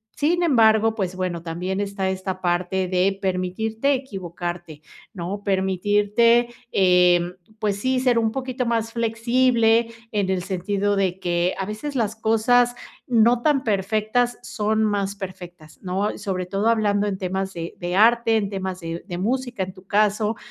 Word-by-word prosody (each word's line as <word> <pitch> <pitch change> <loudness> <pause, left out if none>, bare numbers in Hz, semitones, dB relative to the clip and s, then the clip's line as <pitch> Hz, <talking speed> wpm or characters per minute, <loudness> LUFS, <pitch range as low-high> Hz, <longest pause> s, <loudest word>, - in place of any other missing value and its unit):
Sin 345 +4 +1
embargo, 225 -6 +4
pues 190 -4 -3
bueno, 180 -2 -3
también 180 +4 -3
está 200 -1 -2
esta 185 0 -4
parte 180 +1 0
de 190 +2 +1
permitirte 205 +8 -1
equivocarte, 175 - -6 0.3
¿no? 195 +2 -5
Permitirte, 205 +5 +2 0.2
em, 180 -1 +4 0.2
pues 205 -2 -1
sí, 260 +4 0
ser 250 -2 +3
un 225 -1 +1
poquito 255 -1 -3
más 230 -1 -1
flexible, 230 0 +2 0.2
en 200 -3 0
el 185 -2 0
sentido 200 +2 -1
de 190 -2 0
que 175 0 0
a 190 - -2
veces 240 +8 -5
las 220 -3 0
cosas 235 +2 +2 0.3
no 235 0 +4
tan 280 -1 +2
perfectas 215 +4 0
son 215 +1 0
más 200 -1 0
perfectas, 180 -5 -10
¿no? 195 +2 -2
Sobre 190 -3 -3
todo 200 +4 -1
hablando 210 -2 +2
en 195 -2 -2
temas 190 +1 -3
de 170 0 -6
de 175 0 -3
arte, 230 +1 +4
en 200 -2 -1
temas 190 -2 -4
de 165 0 -5
de 175 -2 -5
música 245 +1 -1
en 185 0 -7
tu 185 +1 -17
caso, 210 +1 +1
205 Hz, 155 wpm, -23 LUFS, 185-230 Hz, 0.3 s, embargo